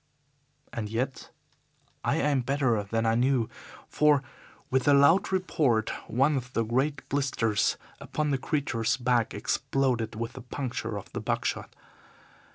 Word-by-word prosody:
And 110 -4 -3
yet 125 +4 -3 0.7
I - - +1
aimed 140 -4 +1
better 135 -6 +2
than 115 +3 -1
I 115 - +3
knew, 125 -1 +2 0.4
for, 150 -2 +3 0.5
with 130 +1 +1
a 145 - +7
loud 140 +9 +5
report, 145 -12 +1 0.2
one 135 +5 +3
of 125 0 -6
the 115 - +1
great 130 +6 -1
blisters 130 -6 +1 0.2
upon 150 -1 -2
the 135 - +1
creature's 130 -6 0
back 120 -2 +1
exploded 125 -5 0
with 115 +1 -4
the 130 - -8
puncture 120 -3 -4
of 100 - -10
the - - -3
buck - - -1
shot. - - -3
130 Hz, 145 wpm, -28 LUFS, 115-140 Hz, 0.7 s, a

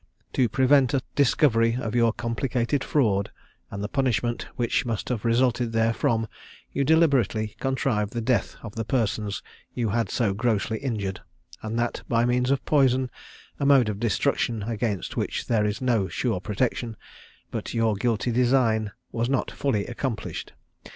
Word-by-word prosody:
To 125 -3 +2
prevent 130 +2 +4
a 130 - 0
discovery 120 -4 +3
of 115 -3 -3
your 115 -1 +4
complicated 120 +3 -1
fraud, 105 -9 +1 0.4
and 100 +1 -5
the - - -1
punishment 120 -3 0
which 120 +1 +1
must 115 -4 -3
have 120 -5 -2
resulted 120 0 +2
therefrom, 115 0 +1 0.5
you 140 - 0
deliberately 135 - +2
contrived 130 -6 0
the 120 - -3
death 115 +1 0
of 105 -3 -7
the 115 - -3
persons 110 -4 -1 0.3
you 120 -3 0
had 115 -1 0
so 110 -6 +1
grossly 110 0 0
injured, 105 -8 -3 0.4
and 110 +1 -3
that 120 0 -1
by 115 0 +3
means 125 +1 +1
of 140 -1 +1
poison, 130 -3 +3 0.5
a 140 - 0
mode 135 -6 +5
of 100 -1 -4
destruction 115 0 0
against 105 -3 -2
which - - -2
there 110 -3 +2
is 105 +5 -3
no 115 -6 +2
sure 115 -4 -1
protection; 110 +2 -2 0.5
but - - -4
your 115 -1 +2
guilty 115 +3 0
design 120 -3 +2 0.2
was 115 +1 -1
not 135 - 0
fully 110 -8 -1
accomplished. 120 -1 -4
115 Hz, 155 wpm, -25 LUFS, 110-130 Hz, 0.5 s, mode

